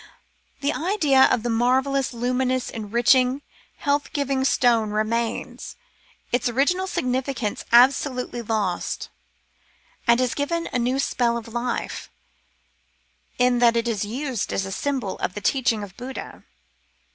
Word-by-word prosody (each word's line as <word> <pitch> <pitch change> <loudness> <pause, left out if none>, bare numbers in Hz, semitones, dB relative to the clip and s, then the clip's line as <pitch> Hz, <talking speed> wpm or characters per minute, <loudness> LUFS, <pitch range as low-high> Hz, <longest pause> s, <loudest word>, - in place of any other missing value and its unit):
The 285 +1 +1
idea 305 -7 +3
of 235 - +1
the 240 - -1
marvellous, 260 +3 +1
luminous, 250 +1 -1
enriching, 245 +5 +2 0.3
health 285 -1 0
giving 275 -2 0
stone 235 -4 +3
remains, 220 +2 -2 0.6
its 245 0 +1
original 325 +10 +1
significance 255 - -2
absolutely 250 0 +3
lost, 210 -6 -2 1.0
and 235 +1 +5
is 255 -1 +1
given 335 +4 -2
a 250 - +1
new 250 +2 0
spell 240 -3 +1
of 230 0 -8
life, 240 0 -3 1.3
in 250 0 +3
that 235 -1 +4
it 230 0 0
is 215 -4 -1
used 250 +2 -3
as 195 - -1
a 195 - -6
symbol 255 -3 -2
of 185 - -3
the - - -3
teaching 235 -2 +1
of 195 -2 -10
Buddha. 255 +1 -8
250 Hz, 130 wpm, -23 LUFS, 230-270 Hz, 1.3 s, and